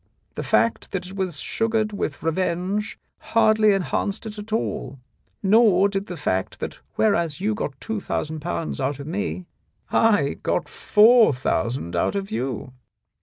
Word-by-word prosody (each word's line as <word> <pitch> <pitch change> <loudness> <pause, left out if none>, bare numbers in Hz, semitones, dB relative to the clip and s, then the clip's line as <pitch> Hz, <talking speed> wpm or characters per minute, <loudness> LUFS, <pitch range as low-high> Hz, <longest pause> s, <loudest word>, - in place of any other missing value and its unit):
The - - -4
fact 230 - +1
that 185 -2 -2
it 185 +2 -9
was 185 -6 -2
sugared 225 -1 0
with 150 -7 -3
revenge 185 +5 -1 0.2
hardly 220 -1 +4
enhanced 195 +2 -1
it 215 -1 -7
at 210 +1 -9
all, 175 - -2 0.4
nor 205 -1 +5
did 195 0 -3
the 180 - -6
fact 95 -10 -2
that - - -5 0.2
whereas 170 -7 +1
you 210 +3 0
got 145 -10 -4
two 220 -1 -3
thousand 155 -4 -3
pounds 160 -2 -3
out 140 +2 -1
of 140 - -6
me, 185 +2 -3 0.5
I 205 -11 +3
got - - -1
four 220 -3 +5
thousand 120 -7 -1
out 85 - +1
of 195 0 -3
you. 125 +1 -3
190 Hz, 155 wpm, -23 LUFS, 150-215 Hz, 0.5 s, nor